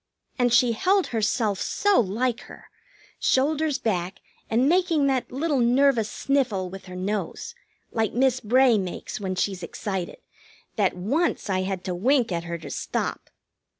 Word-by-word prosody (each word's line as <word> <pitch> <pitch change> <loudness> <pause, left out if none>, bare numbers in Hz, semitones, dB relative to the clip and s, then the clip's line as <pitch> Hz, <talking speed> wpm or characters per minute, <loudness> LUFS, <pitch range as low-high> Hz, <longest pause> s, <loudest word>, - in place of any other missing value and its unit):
And 245 -1 +3
she 240 0 +5
held 375 - +2
herself 215 -2 0
so 410 -1 +2
like 230 +4 0
her, - - -14 0.5
shoulders 295 +2 +1
back, 185 -4 -2 0.3
and 240 +4 +2
making 340 -3 +2
that 265 -2 0
little 285 +2 0
nervous 245 -2 +3
sniffle 235 -10 -1
with 195 0 -9
her 185 -1 -9
nose, 200 - -3 0.4
like 220 -2 0
Miss 255 +1 +2
Bray 245 0 +4
makes 185 +2 -5
when 190 -2 -3
she's 185 0 -1
excited, 185 +1 -4 0.6
that 200 -5 +1
once 230 - 0
I 185 0 +1
had 190 -1 -3
to 185 - -3
wink 240 +5 +2
at 170 -1 -2
her 170 0 -4
to 160 - -9
stop. - - -3
230 Hz, 150 wpm, -25 LUFS, 190-270 Hz, 0.6 s, she